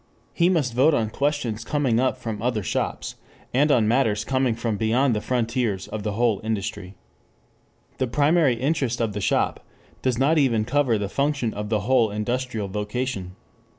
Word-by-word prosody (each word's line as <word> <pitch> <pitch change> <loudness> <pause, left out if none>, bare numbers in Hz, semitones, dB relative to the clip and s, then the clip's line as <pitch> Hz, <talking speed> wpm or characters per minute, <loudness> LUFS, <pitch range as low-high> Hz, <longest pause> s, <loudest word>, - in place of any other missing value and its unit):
He 170 0 +3
must 150 -10 +1
vote 140 +6 +4
on 110 -4 0
questions 140 -6 -1
coming 130 -4 +1
up 130 0 +1
from 115 -4 -5
other 115 -3 -1
shops, - - -3 0.4
and 145 +4 +3
on 115 -6 +3
matters 110 -3 +1
coming 130 -3 +1
from 115 -2 -2
beyond 115 +4 +2
the 105 - -1
frontiers 115 -5 -1
of 110 - -4
the 105 0 -3
whole 115 -2 +1
industry. 100 -3 -4 1.0
The 130 - +1
primary 145 +2 +3
interest 130 -1 -1
of 115 -3 -1
the 105 - -4
shop - - 0 0.4
does 130 -2 0
not 150 +5 +3
even 115 -6 +2
cover 130 -2 +2
the 100 -1 -2
function 140 0 -1
of 105 +1 -5
a 105 -2 +1
whole 120 0 +3
industrial 110 +1 -2
vocation. 105 -1 -4
120 Hz, 170 wpm, -24 LUFS, 105-135 Hz, 1.0 s, vote